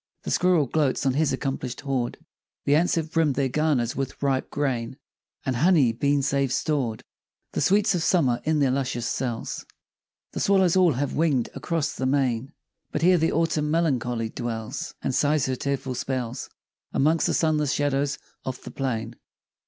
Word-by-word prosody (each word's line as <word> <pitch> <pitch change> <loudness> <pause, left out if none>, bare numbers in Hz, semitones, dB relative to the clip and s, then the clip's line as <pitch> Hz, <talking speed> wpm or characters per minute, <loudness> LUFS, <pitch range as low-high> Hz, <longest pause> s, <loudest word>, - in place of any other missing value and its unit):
The - - -4
squirrel 180 -5 +3
gloats 140 0 0
on 135 - +3
his 145 0 +2
accomplish'd 130 -2 -3
hoard, 135 -4 -2 0.5
The 140 - +3
ants 165 +4 +3
have 160 -1 -2
brimm'd 160 -5 +2
their 135 0 +1
garners 135 -5 +1
with 135 0 -4
ripe 135 -2 0
grain, 130 -3 -2 0.5
And 130 -3 0
honey 155 -4 +4
been 140 +4 +1
save 135 -1 +1
stored 130 -6 -1 0.5
The - - -2
sweets 205 +2 +3
of 175 - 0
summer 150 -9 +2
in 155 0 +1
their 140 -3 +3
luscious 130 -3 -1
cells; 120 -3 -3 0.7
The - - -4
swallows 190 -3 +3
all 180 -4 +5
have 135 +2 -2
wing'd 150 -7 +1
across 165 -3 -2
the 130 - -2
main; 130 -1 0 0.4
But 150 - -2
here 180 0 +5
the 160 - +2
Autumn 155 -2 +1
melancholy 125 -8 0
dwells, 115 +1 -5
And 135 - -1
sighs 145 +1 +2
her 130 - -1
tearful 135 0 -2
spells 125 -1 -3 0.4
Amongst 155 +4 +2
the - - +1
sunless 155 -3 +2
shadows 145 -1 0 0.3
of 130 -1 -4
the - - -8
plain. 115 -4 -3
140 Hz, 170 wpm, -25 LUFS, 125-155 Hz, 0.7 s, all